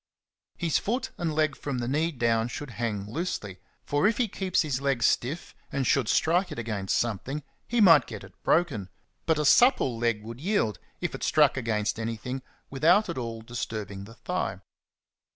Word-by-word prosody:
His 165 -3 +1
foot 240 +6 -2
and 170 -2 0
leg 155 -2 +2
from 140 -3 -4
the 120 -1 -2
knee 155 +6 +1
down 115 -4 +1
should 145 +2 -6
hang 110 -4 -3
loosely, 105 - -4 0.3
for 145 +7 +2
if 220 - +1
he 245 - +2
keeps 190 -3 0
his 140 -4 -2
leg 135 -4 0
stiff 140 +9 0 0.2
and 135 -1 -1
should 125 -2 +2
strike 175 +3 +2
it 155 - -6
against 105 -5 -1
something, 120 +6 -2 0.2
he 240 -1 +1
might 165 - +7
get - - -7
it - - -13
broken; 140 - +1 0.4
but 160 -2 +3
a 150 - 0
supple 145 - +5
leg 115 -3 0
would 115 +3 -8
yield, 155 - 0 0.2
if - - -2
it - - -6
struck - - +4
against 110 -4 -1
anything, 115 +4 -4 0.3
without 175 +9 +4
at 170 - -3
all 115 -2 -5
disturbing 110 -4 -5
the 115 +2 -13
thigh. 100 - -3
130 Hz, 180 wpm, -27 LUFS, 115-165 Hz, 0.4 s, might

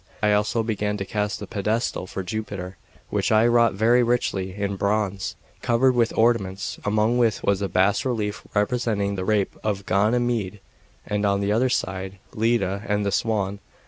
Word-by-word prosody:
I 105 0 +4
also 105 +2 +1
began 105 -2 -1
to 100 - -4
cast 105 +1 -2
the - - -6
pedestal 105 -2 -2
for 95 - -5
Jupiter, 95 -2 -5 0.4
which - - 0
I 110 +1 +5
wrought 120 -3 +4
very 115 +4 +4
richly 100 -6 0
in 100 -1 -2
bronze, 100 -1 -1 0.3
covered 125 +2 +3
with 120 -2 +2
ornaments, 105 -5 +1
among 110 +3 +2
which 115 -3 +1
was 100 -1 +1
a 100 - -1
bas 95 +6 +2
relief, 110 -6 -2
representing 105 -2 0
the 95 -2 -3
rape 105 -2 +1
of 100 -2 -2
Ganymede, 110 -1 +1 0.5
and 105 0 -1
on 100 -1 +2
the 100 +1 0
other 120 +5 +2
side 95 -4 -2 0.2
Leda 110 -3 +1
and 105 0 0
the 100 - 0
Swan. 100 -2 0
105 Hz, 170 wpm, -24 LUFS, 100-115 Hz, 0.5 s, I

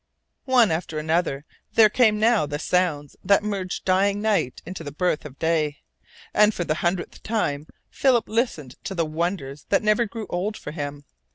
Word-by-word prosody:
One 240 -7 +5
after 160 -1 -2
another 155 -2 0 0.3
there 220 -1 +8
came 215 -1 +3
now 220 -7 +3
the 145 0 -3
sounds 155 -3 0
that 200 0 +4
merged 195 -3 -3
dying 195 +2 +2
night 205 -11 0
into 175 0 -7
the 145 - -6
birth 155 +1 -1
of 140 -2 -10
day, 155 -3 0 0.6
and 210 0 +4
for 175 - -1
the 155 - 0
hundredth 175 +1 -2
time 155 -9 -2 0.2
Philip 255 -4 +2
listened 190 - -2
to 195 - -4
the 165 -2 +1
wonders 155 -3 -3
that 200 - +2
never 215 +2 +3
grew 220 +1 -6
old 200 +5 -2
for - - -7
him. 145 -2 -6
180 Hz, 175 wpm, -24 LUFS, 150-210 Hz, 0.6 s, there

